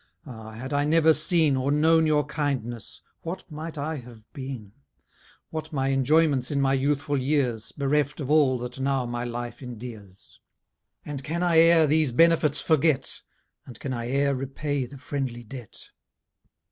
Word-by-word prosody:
Ah! 110 -5 -9
had 130 +6 -6
I 145 0 +2
never 160 +1 +5
seen, 160 -5 +2
Or 130 +2 0
known 160 +2 +4
your 150 -1 +2
kindness, 135 -7 -3 0.2
what 180 +3 -5
might 155 +1 -6
I 150 +2 -3
have 120 -4 -12
been? 130 -8 -7 0.8
What 155 0 -5
my 135 -3 0
enjoyments 135 0 +3
in 145 - 0
my 135 -1 +2
youthful 140 +1 0
years, 130 -5 0
Bereft 145 +1 0
of 145 -1 -3
all 145 -4 +4
that 125 +1 -7
now 135 -1 0
my 120 0 -3
life 120 0 -5
endears? 110 -6 -10 0.7
And 140 -2 -5
can 170 +6 -2
I 170 -2 +4
e'er 165 -1 +6
these 155 -2 +2
benefits 165 0 +4
forget? 155 -3 +2 0.5
And 120 -4 -11
can 135 - -4
I 120 -1 -4
e'er 140 +1 +2
repay 135 0 -3
the 140 +3 -11
friendly 130 -3 -4
debt? 120 -1 -10
140 Hz, 160 wpm, -26 LUFS, 125-155 Hz, 0.8 s, e'er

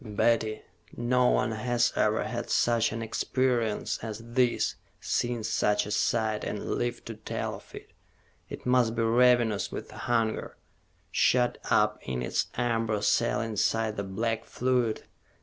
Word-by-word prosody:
"Betty, 110 0 0 0.3
no 125 +1 +2
one 110 - +1
has 120 +2 +1
ever - - +2
had - - -4
such 115 -1 +2
an 115 +1 -4
experience 120 -1 0
as 110 -2 -5 0.2
this, 125 -1 +2 0.3
seen 120 -2 -1
such 105 -1 +1
a 105 - -6
sight, 110 -1 0
and 105 - -4
lived 120 0 -2
to 115 - -6
tell 110 - -4
of - - -11
it. - - -11 0.6
It - - -8
must 125 -2 +3
be 115 - +1
ravenous 120 -2 +3
with - - -7
hunger, 115 -2 -1 0.5
shut 125 -1 +2
up 105 0 +3
in 60 -1 -4
its - - -1
amber 115 -3 0
cell - - +2
inside 110 0 0
the 100 - -3
black 115 +3 -2
fluid. 125 -3 0
115 Hz, 145 wpm, -28 LUFS, 110-120 Hz, 0.6 s, must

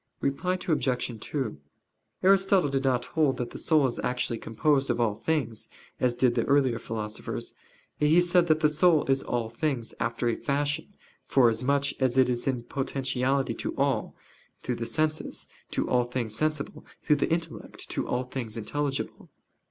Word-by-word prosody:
Reply 140 +7 0
Obj. 130 -7 0
2: 130 - -3 0.6
Aristotle 195 -3 +4
did 135 -1 0
not 125 -2 +1
hold 140 -1 +1
that 125 - -3
the - - -8
soul 155 -4 +3
is 125 - -1
actually 125 -2 -1
composed 135 +4 +1
of - - +1
all 115 -3 +2
things, 120 -3 -2 0.3
as 125 -1 +2
did 125 -1 +3
the 115 -1 +1
earlier 135 -4 +3
philosophers; 110 -1 -5 0.5
he 150 +3 +5
said 175 0 +4
that 155 -1 +3
the 150 - +5
soul 155 +1 +4
is 135 0 +2
all 120 -2 -2
things, 120 0 -2
"after 115 +1 -1
a 115 - +2
fashion," 145 +7 -1 0.3
forasmuch 135 +3 +3
as 130 -1 +2
it 130 -1 +5
is 120 +1 -2
in 125 -3 0
potentiality 135 -1 -1
to - - -4
all 135 -5 0 0.5
through 125 -2 -2
the 115 - -3
senses, 155 +6 -1 0.2
to - - -1
all 125 -1 +3
things 120 -3 -3
sensible 155 0 -2 0.2
through 150 - +3
the 145 - 0
intellect, 165 -1 -4
to - - -2
all 125 +1 0
things 125 -3 -5
intelligible. 140 +5 -3
135 Hz, 165 wpm, -28 LUFS, 120-150 Hz, 0.6 s, he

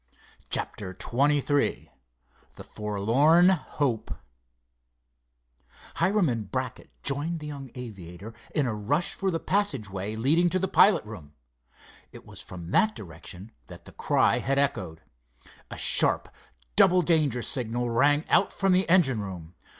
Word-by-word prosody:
CHAPTER 95 -3 -2
XXIII 145 +2 0 0.6
THE - - -10
FORLORN 115 - +2
HOPE 145 - -2 1.8
Hiram 190 +1 +2
and 115 -6 -3
Brackett 130 -1 -5
joined 150 +4 0
the 150 - -9
young 140 -3 -8
aviator 100 -4 -9 0.2
in 150 - +1
a 120 - -2
rush 140 - -1
for 195 - -2
the 165 -3 -2
passageway 110 - -2
leading 155 +10 +2
to 185 - 0
the 190 +1 -1
pilot 200 - +4
room. 85 -10 -11 0.8
It - - -14
was - - -10
from 85 -1 -9
that 215 0 +2
direction 90 +3 -11 0.2
that - - -13
the - - -12
cry - - +1
had 135 +1 -1
echoed. 100 - -1 0.7
A - - -8
sharp, - - +4 0.5
double 180 0 +5
danger 150 -7 +1
signal 120 -1 -2
rang 145 +6 +2
out 195 - +2
from 195 -1 0
the 185 -1 +1
engine 140 - +3
room. 90 -4 -8
130 Hz, 135 wpm, -26 LUFS, 105-165 Hz, 1.8 s, double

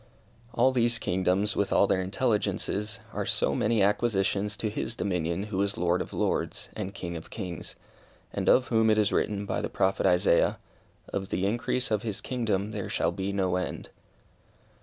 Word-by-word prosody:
All 125 +3 +4
these 120 -2 +3
kingdoms, 95 +1 0
with 100 - 0
all - - +5
their 95 -1 +1
intelligences, 105 0 -1
are - - -1
so - - +1
many 110 -1 +2
acquisitions 105 -1 +1
to 110 - -1
His 110 +2 -3
dominion 90 -2 -1
who 105 -2 -2
is 100 0 -1
Lord 90 +1 +1
of - - -6
lords, - - -1
and 100 -3 -4
King 85 -3 -6
of 80 - -8
kings, 90 -6 -6 0.6
and - - 0
of 130 - +4
whom 110 -1 +3
it 110 - +4
is 105 -2 +2
written, 100 -1 0
by - - -2
the - - -3
Prophet 95 0 +1
Isaiah, 90 -1 +3 0.5
"Of 95 -1 -3
the 95 - 0
increase 120 +4 0
of 105 -2 +2
his 110 -3 -3
kingdom 110 -5 -1
there 105 -3 -4
shall 80 - +1
be 95 +2 -3
no 95 -2 +1
end." 90 - -4
100 Hz, 180 wpm, -28 LUFS, 95-110 Hz, 0.6 s, all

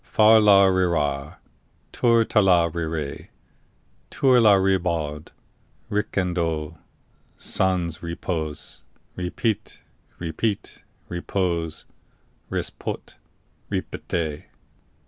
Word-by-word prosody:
Far 110 +1 +5
la 100 -2 +7
rira, 85 -6 0 0.5
Tour 115 -2 +3
tala 90 -7 +4
rire, 80 -3 -4 0.8
Tour 130 -3 +4
la 105 -3 +7
Ribaud, 85 -6 0 0.6
Ricandeau, 85 -6 -1 0.6
Sans 90 -4 -1
repos, 85 -2 -4 0.3
repit, 100 +4 -2 0.4
repit, 90 +5 -3 0.3
repos, 85 -2 -2 0.6
ris - - -2
pot, - - -6 0.6
ripette! 80 -3 -3
90 Hz, 70 wpm, -24 LUFS, 80-100 Hz, 0.8 s, la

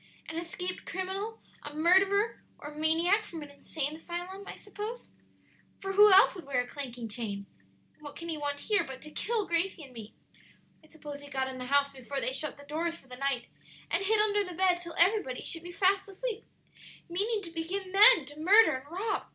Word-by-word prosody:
"An 320 - -7
escaped 360 +2 -5
criminal 385 +5 -4 0.2
a 295 0 -7
murderer 385 +6 +3 0.2
or 295 - -8
a 300 - -12
maniac 330 +7 +2
from 330 -6 -8
an 290 - -11
insane 290 +1 -3
asylum, 355 +4 -6
I - - -7
suppose; 420 +4 -7 0.7
for 390 0 -4
who 415 +1 +8
else 380 +1 +7
would 355 -7 -10
wear 275 -3 0
a 245 - 0
clanking 245 -4 -6
chain? 205 -3 -4 0.5
and - - -31
what 290 -1 -9
can 335 - -7
he 330 - -1
want 285 -1 -3
here 415 -2 +2
but 265 -1 -8
to 305 - -10
kill 440 +4 -1
Gracie 340 -1 -1
and 265 -3 -13
me? 225 -2 -10 0.7
I - - -19
suppose 295 -2 -9
he 285 - -11
got 265 -2 -1
in 260 -1 -7
the 250 - -5
house 280 +1 +2
before 270 +1 -5
they 260 - -1
shut 290 +2 -2
the 285 - -13
doors 330 +3 -2
for 270 - -19
the 250 - -8
night, 265 -2 -1 0.5
and - - +1
hid 430 +2 +2
under 415 -1 +3
the 365 -3 -7
bed 365 -2 +3
till 340 -2 -7
everybody 350 - +3
should 330 - -3
be 350 +1 -9
fast 390 +3 +2
asleep, 445 +3 -5 0.6
meaning 410 +5 -1
to 335 - -6
begin 365 +4 -4
then 400 - +8
to 290 +2 -10
murder 390 -1 +6
and 265 +3 -13
rob. 410 +5 -2
335 Hz, 210 wpm, -30 LUFS, 285-390 Hz, 0.7 s, who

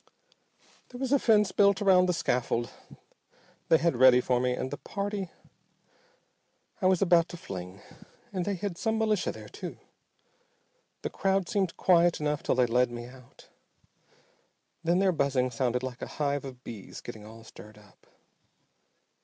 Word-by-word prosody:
"There 245 - -10
was 265 -1 -2
a 285 - +4
fence 210 -5 +3
built 200 -1 +4
around 185 -3 +4
the 180 - +1
scaffold 120 -6 -1 1.0
they 160 - +6
had 165 -3 +1
ready 125 0 +7
for 125 0 +1
me 125 0 +1
and 130 +1 -4
the 145 - -4
party 200 -2 -4 1.5
I 185 - +3
was 185 0 +3
about 170 -2 +4
to 175 - -8
fling, 95 - -8 0.5
and 185 -2 -1
they 200 +2 -1
had 185 -1 -5
some 220 -1 0
militia 215 -5 +1
there, 110 -1 -11
too. - - -8 1.3
The - - -3
crowd 195 -2 0
seemed 195 -5 -1
quiet 175 -2 +4
enough 150 -1 -1
till - - 0
they 125 0 +4
led 125 +1 +2
me 120 0 -7
out. 125 0 -16 1.3
Then 170 +2 +2
their 190 0 +3
buzzing 140 -5 0
sounded 125 +1 -1
like 125 -1 -6
a - - -4
hive 145 -1 -1
of 130 -2 -10
bees 110 -5 -9
getting 110 -3 -9
all 110 +1 -12
stirred 105 -1 -14
up. 105 -2 -21
150 Hz, 160 wpm, -28 LUFS, 125-190 Hz, 1.5 s, ready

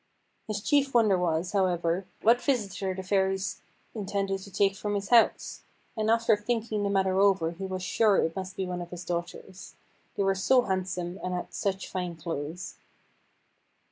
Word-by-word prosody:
His 210 -2 -3
chief 280 +2 +2
wonder 215 -5 +5
was, 175 0 0
however, 180 -2 0 0.2
what 235 +2 +5
visitor 200 -8 -1
the 190 - -5
Fairies 190 0 0 0.3
intended 195 -2 -2
to 190 - -11
take 195 +1 +2
from 205 0 -3
his 200 -1 -3
house; 235 -2 +3 0.3
and 220 -1 0
after 230 -1 +4
thinking 215 0 -2
the 200 - 0
matter 190 -1 +2
over 195 -5 +3
he 190 +3 -6
was 185 -1 -4
sure 205 +3 +3
it 165 - +1
must 185 -1 -5
be 190 - -2
one 180 -1 -4
of 175 - -7
his 175 0 -8
daughters 175 +2 -6 0.4
they 200 - 0
were 195 0 +3
so 245 +7 +3
handsome, 185 -2 -3
and 180 0 -2
had 180 - -5
such 195 -1 -2
fine 180 -2 -4
clothes. 160 +1 -5
190 Hz, 170 wpm, -28 LUFS, 180-205 Hz, 0.4 s, wonder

